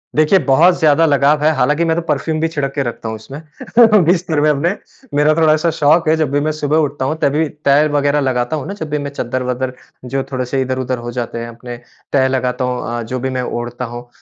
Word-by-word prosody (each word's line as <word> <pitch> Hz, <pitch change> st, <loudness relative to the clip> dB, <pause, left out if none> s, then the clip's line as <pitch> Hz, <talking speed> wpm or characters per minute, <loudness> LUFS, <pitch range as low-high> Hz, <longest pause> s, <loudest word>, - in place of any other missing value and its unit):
देखिए 155 Hz, +5 st, +4 dB
बहुत 165 Hz, +7 st, +4 dB
ज़्यादा 160 Hz, 0 st, +4 dB
लगाव 145 Hz, 0 st, +2 dB
है। 155 Hz, -, +4 dB
हालाँकि 150 Hz, +6 st, +1 dB
मैं 165 Hz, -1 st, +1 dB
तो 170 Hz, -, -1 dB
परफ्यूम 160 Hz, -1 st, -1 dB
भी 165 Hz, -, +1 dB
छिड़क 145 Hz, -4 st, -3 dB
के 140 Hz, -, 0 dB
रखता 120 Hz, -2 st, -5 dB
हूँ 110 Hz, -, -4 dB
इसमें 160 Hz, -, +1 dB
बिस्तर 170 Hz, -3 st, +1 dB
में 150 Hz, -, +3 dB
अपने। 160 Hz, +6 st, +1 dB, 0.4 s
मेरा 150 Hz, +1 st, +4 dB
थोड़ा-सा 155 Hz, 0 st, +3 dB
शौक 155 Hz, +3 st, +3 dB
है 160 Hz, -, +4 dB
जब 155 Hz, -4 st, 0 dB
भी 145 Hz, -, +1 dB
मैं 155 Hz, -, +1 dB
सुबह 150 Hz, 0 st, -1 dB
उठता 145 Hz, -3 st, -1 dB
हूँ 155 Hz, +4 st, -2 dB
तभी 150 Hz, +3 st, +1 dB, 0.2 s
तह 140 Hz, +2 st, +5 dB
वगैरह 145 Hz, 0 st, +2 dB
लगाता 130 Hz, +1 st, -1 dB
हूँ 145 Hz, -, -5 dB
ना, 200 Hz, -, -4 dB
जब 160 Hz, -6 st, -6 dB
भी 150 Hz, -, -1 dB
मैं 145 Hz, -, -4 dB
चद्दर-वद्दर 125 Hz, -1 st, -3 dB, 0.3 s
जो 135 Hz, +2 st, -2 dB
थोड़े-से 130 Hz, +1 st, -2 dB
इधर-उधर 130 Hz, 0 st, -2 dB
हो 120 Hz, 0 st, -6 dB
जाते 120 Hz, -1 st, -4 dB
हैं 115 Hz, -, -5 dB
अपने 120 Hz, +1 st, -9 dB, 0.4 s
तह 135 Hz, -2 st, +3 dB
लगाता 130 Hz, -1 st, -1 dB
हूँ 125 Hz, -1 st, -3 dB
अ, -, -, -3 dB
जो 125 Hz, +3 st, -4 dB
भी 130 Hz, +2 st, -2 dB
मैं 130 Hz, -1 st, -2 dB
ओढ़ता 120 Hz, 0 st, -4 dB
हूँ। 120 Hz, +1 st, -8 dB
140 Hz, 230 wpm, -17 LUFS, 125-155 Hz, 0.4 s, तह